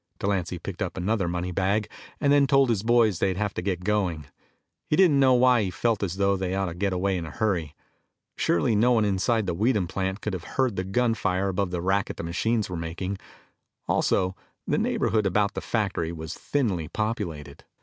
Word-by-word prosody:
Delancy 95 -3 -1
picked 90 +3 -7
up 95 -1 -3
another 95 0 0
money 90 +1 -2
bag, 100 +4 0 0.3
and 145 -1 +3
then 140 -1 +5
told 135 -3 +4
his 105 -4 0
boys 110 -5 +3
they'd 95 -2 0
have 105 0 -1
to - - -3
get 90 -1 -2
going. 90 -7 0 0.6
He - - +2
didn't 170 -6 +5
know 130 -2 +5
why 125 -1 +5
he 100 - -1
felt 110 +4 0
as 95 -3 -2
though 100 0 +2
they 95 -1 -2
ought 95 0 0
to 85 - -4
get 95 +3 -1
away 95 +1 0
in 85 - -4
a - - -6
hurry. 90 -10 -1 0.6
Surely 105 +6 +1
no 120 +4 +4
one 110 -3 +3
inside 105 +3 +1
the 90 - -1
Weedham 105 0 +1
plant 95 +2 -2
could 105 - -4
have 90 -2 -4
heard 130 -6 +1
the 95 - -1
gun 115 +5 +1
fire 95 -3 0
above 95 0 -1
the 90 -1 -3
racket 95 +2 0
the - - -5
machines 110 +6 0
were 90 - -5
making. 85 +4 -4 0.7
Also, 95 0 +1 0.3
the - - +1
neighborhood 110 -3 +1
about 100 +2 +1
the - - -4
factory 100 -7 -1
was 80 0 -6
thinly 100 - -1
populated. 85 - -4
100 Hz, 205 wpm, -26 LUFS, 90-110 Hz, 0.7 s, then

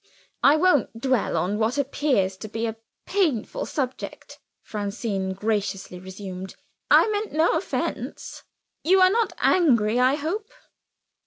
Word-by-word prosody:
"I 285 - +6
won't 310 -8 +2
dwell 255 -2 +1
on 200 +4 -1
what 225 +5 +1
appears 265 -9 +1
to 215 - -7
be 225 +2 -3
a 225 -1 -3 0.3
painful 335 - 0
subject," 265 -3 -5 0.2
Francine 200 -2 -3
graciously 195 -3 -2
resumed. 190 0 -8 0.3
"I - - +6
meant 420 -3 -2
no 315 +2 +3
offense. 325 +4 -3 0.4
You 380 +4 +4
are 370 0 +6
not 450 -1 +1
angry, 240 -10 +3
I 255 +2 +4
hope?" 365 +9 -3
245 Hz, 130 wpm, -24 LUFS, 205-315 Hz, 0.4 s, I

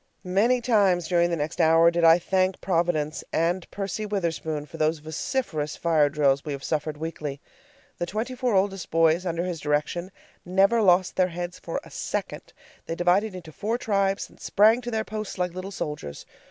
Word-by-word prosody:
Many 220 +7 +2
times 195 -8 +2
during 175 -1 +2
the 170 - 0
next 150 0 -2
hour 165 +1 +5
did 170 0 -1
I 165 0 +8
thank 185 +1 0
Providence 165 -4 0
and 170 +2 0
Percy 200 +1 -4
Witherspoon 165 -7 -2
for - - -11
those 155 +1 +1
vociferous 155 - -3
fire 155 -3 +2
drills 140 -2 +2
we 150 - -4
have 140 0 -7
suffered 155 -1 -2
weekly. 150 -3 -5 0.6
The 175 - -2
twenty 220 +7 -3
four 250 -3 0
oldest 195 -1 0
boys, 165 +2 +3
under 170 0 -1
his 180 -2 -3
direction, 150 +5 -1 0.3
never 195 +5 +3
lost 185 -2 +3
their 185 -1 +4
heads 175 0 -6
for 165 - -4
a - - -15
second. - - -4 0.4
They 165 - -3
divided 185 +4 +2
into 170 -3 -9
four 220 +9 -2
tribes, 195 -4 0
and - - -22
sprang 220 +4 +4
to 240 - -5
their 220 -2 -1
posts 215 -2 -6
like 180 -1 -1
little 185 +2 -6
soldiers. 150 - -6
175 Hz, 180 wpm, -25 LUFS, 160-195 Hz, 0.6 s, I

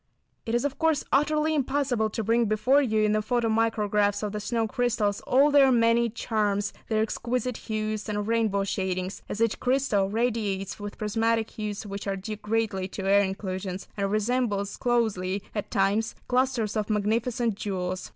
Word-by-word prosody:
It 225 - 0
is 240 - +1
of 285 +2 -3
course 320 -2 +2
utterly 300 +3 +2
impossible 265 -5 0
to 220 +1 -3
bring 230 +2 +2
before 215 +7 +3
you 220 -5 +1
in 210 - +3
the 215 0 +2
photo 235 +1 0
micrographs 210 -2 +1
of 210 - -2
the 210 - -3
snow 225 +1 -1
crystals 225 -4 0
all 280 +3 +5
their 275 -2 +6
many 235 0 +3
charms, 210 -3 -1 0.2
their 220 -1 +2
exquisite 250 +2 -2
hues 215 -1 -3
and 210 0 -2
rainbow 220 -3 +1
shadings, 185 -1 -2
as 210 - -4
each 230 -1 +1
crystal 250 -7 +1
radiates 210 -4 -1
with 205 0 -7
prismatic 225 +1 0
hues 210 -2 -5
which 200 0 -6
are 195 - 0
due 210 +3 -6
greatly 210 -3 -1
to 195 0 -5
air 200 +1 +5
inclusions 190 -1 -4
and 200 -1 -1
resembles 215 -2 0
closely 205 -6 0
at 210 - -4
times, 200 +3 +1
clusters 250 -4 +1
of 215 -1 -1
magnificent 225 +3 0
jewels. 185 -3 -4
215 Hz, 170 wpm, -27 LUFS, 205-235 Hz, 0.2 s, their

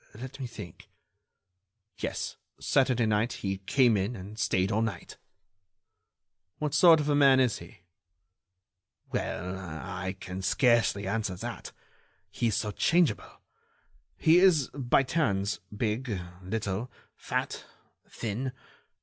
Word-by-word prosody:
Let 130 +5 -8
me 130 - -4
think.... 105 -7 -11 1.1
Yes, - - -3 0.2
Saturday 125 -3 +2
night, 110 +2 +1
he 95 -1 -3
came 120 +3 +3
in 100 +5 -1
and 105 +2 -9
stayed 95 -2 +1
all 110 - +1
night." 115 -2 -4 1.4
"What 150 -2 -2
sort 160 +1 +7
of 150 - -1
a 150 - +2
man 140 -2 +6
is 125 -4 +2
he?" 85 0 -14 1.3
"Well, 90 +2 -3
I 95 +2 -5
can 95 +1 -6
scarcely 115 -2 +2
answer 105 -1 -1
that. - - -6 0.6
He 120 +4 0
is 110 - +1
so 105 - -1
changeable. 170 - +1 0.8
He 165 +1 +5
is, 175 -8 +4
by 135 -1 +2
turns, 100 - 0
big, 105 0 -2 0.2
little, 105 +3 -3 0.3
fat, - - -3 0.5
thin 120 +4 -4
110 Hz, 120 wpm, -29 LUFS, 95-130 Hz, 1.4 s, sort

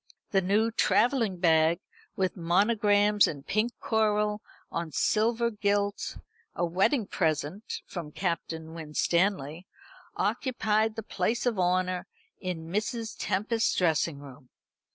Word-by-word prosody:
The 195 - +3
new 210 +5 +2
travelling 230 -3 +2
bag, 165 -1 +3 0.4
with 185 -1 0
monograms 205 +3 +3
in 140 -3 -5
pink 215 +9 0
coral 210 -1 +1 0.3
on 170 -2 -3
silver 235 +7 +1
gilt, 205 -1 -1 0.4
a 175 - 0
wedding 195 - +2
present 165 +3 -2
from 165 -5 -7
Captain 165 -2 -3
Winstanley, 165 +1 0 0.5
occupied 220 0 0
the 225 - -5
place 210 +6 -1
of 235 -5 0
honour 180 0 +1 0.3
in 175 -4 -4
Mrs. 220 +4 -2
Tempest's 220 +4 0
dressing 165 -3 +1
room. 135 -2 -13
195 Hz, 110 wpm, -28 LUFS, 170-215 Hz, 0.5 s, The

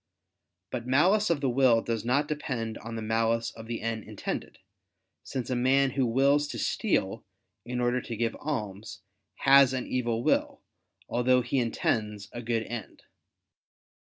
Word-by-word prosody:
But 120 -1 -4
malice 185 +11 +4
of 165 -4 +1
the 135 - +1
will 120 -3 +4
does 115 -2 -2
not 140 +5 +1
depend 125 -7 -3
on 115 0 -7
the 110 - -4
malice 115 +1 +1
of 115 0 -11
the 115 -1 -4
end 110 -1 -2
intended; - - -5 0.6
since 130 -1 -5
a - - +1
man 135 +2 +3
who 130 -1 +1
wills 140 +5 +3
to - - -6
steal - - 0 0.4
in 125 +1 -3
order 125 +1 +1
to 115 -2 -6
give 115 0 -1
alms, 110 -8 -5 0.4
has 135 -1 +7
an 130 -1 -2
evil 120 -2 -1
will, - - 0 0.4
although 125 +1 +2
he 130 +3 0
intends 105 -3 -1
a 120 - -6
good 115 -1 -1
end. 115 -3 -7
120 Hz, 155 wpm, -28 LUFS, 115-135 Hz, 0.6 s, has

